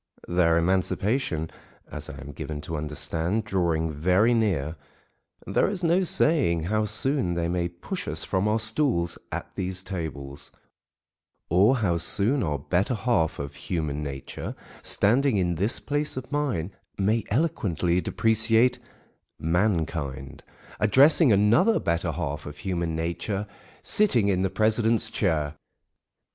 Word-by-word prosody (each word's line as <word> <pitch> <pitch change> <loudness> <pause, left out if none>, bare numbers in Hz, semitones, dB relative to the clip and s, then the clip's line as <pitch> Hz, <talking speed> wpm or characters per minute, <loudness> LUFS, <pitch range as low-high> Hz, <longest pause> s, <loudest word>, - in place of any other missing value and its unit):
Their 85 -2 +3
emancipation 95 - 0 0.4
(as - - -7
I - - -8
am 70 +2 -8
given 75 +1 -6
to 80 +2 -5
understand) 80 +7 -2
drawing 85 -5 0
very 90 +10 +3
near, 90 -10 0 0.7
there - - +1
is 195 -3 -3
no 175 +3 +3
saying 145 - +2
how 110 +5 0
soon 110 -2 0
they 85 -1 0
may 85 0 0
"push 135 - -6
us - - -2
from 95 +1 0
our 105 +1 +2
stools" 110 - 0
at - - -5
these 95 0 -3
tables, 75 -7 -6 1.0
or 100 +10 +5
how 85 -2 +2
soon 105 - +2
our 75 -7 -1
better 90 - 0
half 105 -8 0
of 70 0 -5
human 75 -1 -3
nature, 70 -2 -6 0.3
standing 125 +3 +2
in 90 -2 +1
this 100 +8 0
place 145 -1 -2
of 130 - -6
mine, 130 - -1 0.3
may 105 +3 +1
eloquently 95 - 0
depreciate 115 +6 +3 0.6
mankind, 80 - -1 0.4
addressing 135 - +5
another 115 - +4
better 85 0 -1
half 75 +2 -4
of 75 0 -8
human 85 -2 -2
nature 85 +5 -2 0.4
sitting 125 - +2
in 95 -2 +1
the 95 - +1
president's 110 +2 +2
chair. 75 -7 0
95 Hz, 130 wpm, -26 LUFS, 80-115 Hz, 1.0 s, or